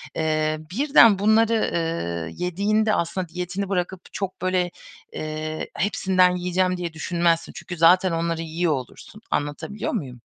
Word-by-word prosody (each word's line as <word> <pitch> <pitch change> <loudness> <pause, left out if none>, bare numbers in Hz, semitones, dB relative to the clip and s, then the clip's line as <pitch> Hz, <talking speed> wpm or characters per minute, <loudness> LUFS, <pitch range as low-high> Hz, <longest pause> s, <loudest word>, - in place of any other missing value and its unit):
eee, 155 -1 0
birden 230 -3 +5
bunları, 220 +2 +3
ııı, 85 - -2
yediğinde 205 +5 0
aslında 180 +2 -1
diyetini 180 +3 -4
bırakıp 185 -1 -2
çok, 190 -3 -4
böyle, 185 -1 0 0.4
eee, 155 0 -4
"Hepsinden 185 -2 +2
yiyeceğim." 180 +1 0
diye 175 -2 -4
düşünmezsin. 170 0 0
Çünkü 175 - -7
zaten 180 +3 +5
onları 165 0 -1
yiyor 165 0 0
olursun. 135 - -8
Anlatabiliyor 145 +9 -2
muyum? 130 - -5
180 Hz, 125 wpm, -23 LUFS, 160-190 Hz, 0.4 s, birden